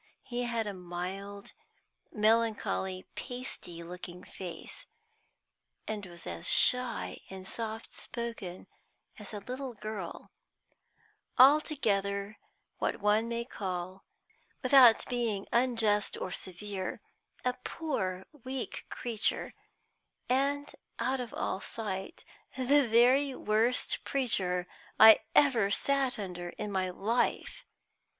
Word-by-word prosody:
He 245 -1 -3
had 230 -2 -1
a 205 - -3
mild, 185 +3 -6 0.6
melancholy, 215 -4 +1
pasty 245 -9 -6
looking 180 +1 -8
face, 190 - -7 1.0
and 215 -1 -3
was 170 -1 -9
as 85 -1 -3
shy 250 -2 +4
and 190 0 -8
soft 225 0 -5
spoken 230 -7 -6 0.5
as 210 - -9
a 210 - -5
little 255 0 -6
girl 210 -4 -6 1.1
altogether, 215 -8 +3 0.4
what - - -1
one 210 +2 +2
may 235 0 -2
call, 185 -4 -5 0.6
without 255 -3 +7
being 230 -5 -1
unjust 225 -4 +2
or 185 - -4
severe, 190 +1 -5 0.5
a 250 - +2
poor, 190 - -3 0.2
weak 260 -1 -5
creature, 230 -4 -1 0.7
and, 280 +3 +1 0.3
out 255 +3 0
of 245 -2 -5
all 190 - -2
sight, 205 - -5 0.3
the 270 +1 +4
very 255 +4 +4
worst 225 +3 +1
preacher 190 -9 0 0.3
I 220 0 +10 0.2
ever 240 -9 +5
sat 270 +3 +2
under 180 -4 -5
in 210 -1 -4
my 190 -1 0
life. 220 +7 -1
220 Hz, 105 wpm, -31 LUFS, 190-250 Hz, 1.1 s, I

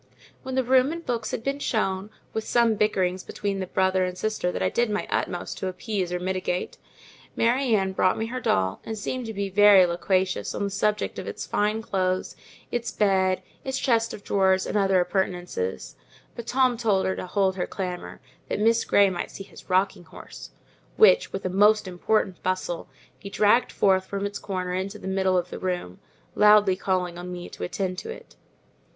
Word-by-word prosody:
When 260 -1 -5
the 260 - +2
room 260 +3 +3
and 335 0 -6
books 235 -2 -2
had 225 - -4
been 275 +2 -2
shown, 195 -6 -1 0.2
with 220 - -2
some 235 -1 +3
bickerings 185 -3 0
between 200 -1 -3
the 185 - -3
brother 190 0 +1
and 180 0 -3
sister 215 -3 -1
that - - -3
I - - +2
did 240 -1 +1
my 210 0 -1
utmost 175 -1 -2
to 190 - -2
appease 185 -1 -3
or 180 - -1
mitigate, 185 0 -3 0.6
Mary 245 0 +2
Ann 190 -2 +1
brought 185 -1 +2
me 220 - -1
her 250 +3 -4
doll, 95 - 0
and 220 - -5
began 255 +5 -3
to 225 - -5
be 200 -2 -3
very 205 -1 +7
loquacious 185 +2 0
on - - -2
the 200 - -1
subject 210 +2 -1
of - - -7
its - - -5
fine 210 +2 0
clothes, 185 -2 -1 0.4
its 240 0 -2
bed, 190 -2 +2 0.2
its 265 0 -2
chest 230 -3 +1
of 200 - -9
drawers, 190 -1 +2
and - - -4
other 195 -2 +3
appurtenances; 180 - -2 0.4
but 235 -1 -8
Tom 255 -1 +2
told 210 -5 +1
her 190 - 0
to - - -6
hold 190 0 +1
her 180 - -2
clamour, 180 -6 -5 0.3
that - - -1
Miss 230 +2 +3
Grey 200 -1 +4
might 175 - -4
see 195 - -8
his - - -15
rocking 185 -1 +1
horse, - - -11 0.5
which, - - +5
with 195 - -5
a - - 0
most 210 +2 +4
important 185 +1 -1
bustle, 185 -2 -2 0.3
he 200 - -8
dragged 215 +4 +3
forth 190 -1 +2
from 200 0 -3
its 205 0 -4
corner 185 -2 -3
into 190 +3 -3
the - - -8
middle 190 -1 +1
of 180 0 -2
the - - -6
room, 180 - -3 0.3
loudly 210 -2 +5
calling 180 -2 -1
on 180 +1 -7
me 175 -1 -6
to - - -8
attend 185 0 -3
to - - -8
it. 460 - -10
195 Hz, 195 wpm, -25 LUFS, 185-220 Hz, 0.6 s, very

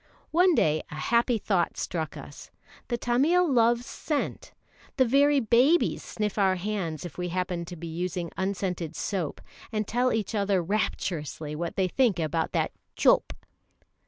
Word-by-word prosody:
One 355 +1 +4
day 155 - +2
a - - -8
happy 235 +9 +2
thought 190 -5 0
struck 160 -3 -3
us. - - -10 0.4
The 240 - -1
Tamil 290 +10 +3
loves 240 -3 +3
scent. 295 +1 -3 0.5
The 260 - +5
very 280 +3 +4
babies 255 +8 +3
sniff 210 -1 -3
our 190 -1 +3
hands 180 -5 -3
if 175 - -8
we 180 0 -2
happen 180 -1 -2
to 175 - -8
be 170 0 -8
using 170 +1 -3
scented 185 -4 -2
soap, 180 -8 -3 0.3
and 215 -2 -1
tell 250 +2 +1
each 220 -1 -1
other 200 -2 +1
rapturously 165 -5 -2
what 170 +2 -4
they 190 -1 +2
think 235 0 +2
about 160 0 -1
that - - 0 0.2
"chope." - - +4
195 Hz, 155 wpm, -27 LUFS, 170-240 Hz, 0.5 s, The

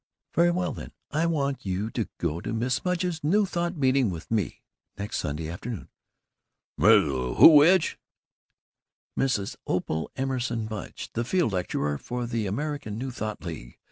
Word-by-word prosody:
"Very 170 +1 +4
well 180 +1 0
then, - - -9 0.2
I 160 +3 +1
want 140 -4 -1
you 100 +3 -2
to - - -2
go 80 +3 -2
to - - -4
Mrs. 125 +3 0
Mudge's 180 -3 -1
New 200 +8 +3
Thought 175 -2 -2
meeting 130 -4 +3
with 85 +1 -7
me, 105 -6 -1 0.3
next 100 +1 -3
Sunday 75 +2 -3
afternoon." 100 +5 -6 0.9
"Mrs. 75 - +4
Who's 155 -2 +10
which?" 165 +2 +4 1.2
"Mrs. 115 -7 0
Opal 80 0 -1
Emerson 125 -4 -1
Mudge. 110 -3 -7
The 120 - -1
field 160 - +1
lecturer 75 -5 -1
for 125 0 -4
the 115 -3 -2
American 135 -1 -3
New 130 +2 -4
Thought 110 -3 -5
League. 75 -9 -7
120 Hz, 150 wpm, -27 LUFS, 95-150 Hz, 1.2 s, Who's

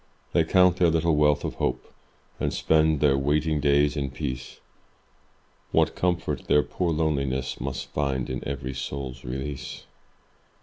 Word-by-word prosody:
They 85 - +4
count 90 +1 +4
their 90 -2 +4
little 80 0 +2
wealth 75 -1 +3
of - - -3
hope - - -3 0.5
And - - 0
spend 80 -2 +2
their 70 -2 +4
waiting 75 +3 +1
days 70 0 +3
in 70 -2 -2
peace, 65 0 -5 1.1
What - - +3
comfort 90 -1 -1
their 75 - +4
poor 90 -2 -2
loneliness 70 -5 -1
Must 65 +1 -3
find 70 -3 -1
in 65 0 -4
every 65 -1 -4
soul's 65 0 -5
release! 65 +1 -5
70 Hz, 140 wpm, -26 LUFS, 65-80 Hz, 1.1 s, They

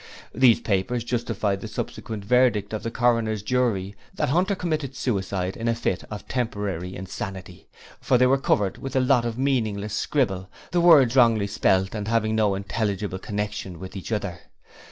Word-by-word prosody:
These 125 -1 +5
papers 110 +4 0
justified 110 -5 -1
the - - -5
subsequent 105 -3 -5
verdict 115 -4 +2
of 110 - -2
the 115 - -3
Coroner's 115 -3 +1
jury 105 -5 0 0.2
that - - 0
Hunter 185 +7 +2
committed 155 -7 -3
suicide 95 -6 -2
in 115 - -4
a 115 - +2
fit 95 -5 -2
of 105 -1 -7
temporary 100 -7 -3
insanity, 95 -1 -7 0.3
for 125 - +2
they 125 - +5
were 135 +2 +3
covered 100 -7 +1
with 135 -1 -6
a - - +4
lot 125 -2 +3
of 115 -1 -3
meaningless 110 -7 0
scribbling, 100 -7 0 0.2
the 175 - +2
words 145 -8 +6
wrongly 115 -5 +5
spelt 95 -1 +1
and 105 -2 -4
having 110 -1 +1
no 105 -3 +2
intelligible 100 -1 -2
connection 105 -3 -4
with 95 +1 -9
each 95 -5 -7
other. - - -2
110 Hz, 170 wpm, -24 LUFS, 100-125 Hz, 0.3 s, words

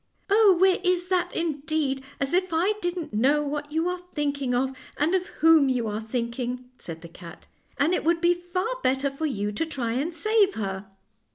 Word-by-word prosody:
" - - -43
Oh, 410 -3 +6
where 380 0 +4
is 360 0 +1
that, 360 -1 +1
indeed! 300 -4 -1 0.2
as 275 +2 -1
if 370 0 +1
I 345 +6 +2
didn't 350 -6 -3
know 275 +8 +3
what 290 0 -4
you 320 +3 0
are 360 0 -2
thinking 280 -4 -1
of, 265 +1 0 0.2
and 305 +5 +1
of 370 -1 +1
whom 315 -3 +4
you 250 -3 0
are 210 +1 -3
thinking," 245 +2 -4
said 165 -1 -8
the - - -8
cat; 170 0 -12 0.3
"and 310 +6 +2
it - - 0
would 335 +1 +2
be 345 +1 +4
far 365 +7 -3
better 270 - +1
for 310 +3 -2
you 210 -6 -2
to 210 - -1
try 250 -7 -3
and 275 +8 -1
save 415 +3 +2
her." 195 -2 -4
295 Hz, 200 wpm, -26 LUFS, 250-350 Hz, 0.3 s, Oh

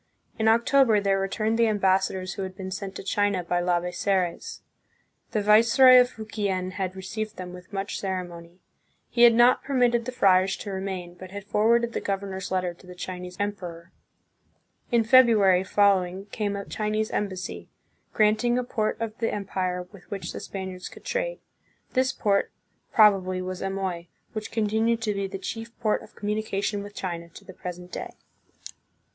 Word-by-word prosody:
In 220 - +2
October 235 0 +4
there 195 -1 +1
returned 215 +4 -1
the 230 - +5
ambassadors 190 -2 +1
who - - -6
had 190 -1 -5
been 190 -1 -6
sent 195 0 -5
to - - -6
China 205 -2 0
by 175 +1 0
Labezares. 180 +1 -1 0.7
The 215 -3 -1
viceroy 235 +5 +7
of 245 - +1
Fukien 205 -5 -3
had 185 -1 -3
received 215 +3 -5
them 180 -1 -7
with 180 +2 -12
much 200 0 -3
ceremony. 180 -2 -5 0.5
He 240 - 0
had 235 -1 +8
not 240 +2 +5
permitted 245 -4 +2
the 255 - -3
friars 190 -5 +3
to 205 - -6
remain, 190 -2 -4
but 185 +1 -11
had 200 +1 -7
forwarded 230 +3 +2
the - - -2
governor's 195 -1 -3
letter 185 -1 -1
to 180 +2 -19
the 180 - -10
Chinese 180 0 -7
emperor. 180 -5 -5 1.0
In 235 -1 +4
Febru 235 -1 +6
ary 190 -2 +4
following 190 -1 +2
came 205 -2 -2
a 200 0 -5
Chinese 215 0 -2
embassy, 190 -3 -4 0.4
granting 220 +3 +2
a 250 - 0
port 220 -3 -2
of 225 -1 -3
the 225 - 0
empire 185 -3 -2
with 200 -4 -16
which 200 -1 -5
the - - -5
Spaniards 190 -2 -6
could - - -15
trade. - - -2 0.5
This 260 +1 +2
port, 205 -6 +1 0.4
probably, 195 -4 +4
was 185 0 -5
Amoy, 190 -3 -3 0.3
which 215 -2 -5
continued 225 +1 +1
to 210 -2 0
be 200 -1 -2
the 195 0 -6
chief 225 +4 -7
port 215 -3 +1
of - - -16
communication 205 -1 -2
with 205 0 -10
China 170 -2 -5
to - - -14
the 185 - -11
present 180 0 -8
day. - - -6
200 Hz, 170 wpm, -26 LUFS, 185-220 Hz, 1.0 s, had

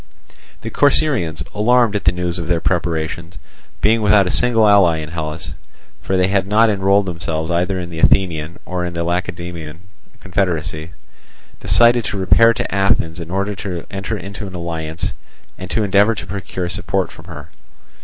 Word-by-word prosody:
The - - -6
Corcyraeans, 130 - +1
alarmed 115 0 +3
at 105 - -2
the 85 - +5
news 90 0 -3
of 85 - -5
their 85 -1 +1
preparations, 85 -1 -2 0.4
being 110 +2 +3
without 105 -1 +4
a 90 - -1
single 115 -3 +3
ally 100 -5 +5
in 75 -1 -6
Hellas 75 -1 -5 0.5
(for 95 - -1
they 90 - +3
had 95 -1 0
not 110 +2 +4
enrolled 100 0 +2
themselves 80 -2 -3
either 90 +2 0
in 85 -1 -6
the 80 - -6
Athenian 85 -3 +2
or 90 -1 -3
in 90 0 -4
the 85 - -1
Lacedaemonian 85 -2 -4 0.4
confederacy), 80 -4 -2 0.7
decided 120 0 +4
to 100 - -3
repair 115 +5 +5
to 115 - -3
Athens 95 -4 +1
in 85 -1 -7
order 100 +3 -1
to 90 -3 -6
enter 100 +3 -4
into 100 +2 -7
alliance 85 -3 -4 0.5
and 95 - -7
to 110 - 0
endeavour 100 +3 +3
to - - -7
procure 95 -2 -5
support 85 - -2
from - - -14
her. 75 +2 -10
90 Hz, 165 wpm, -18 LUFS, 85-100 Hz, 0.7 s, the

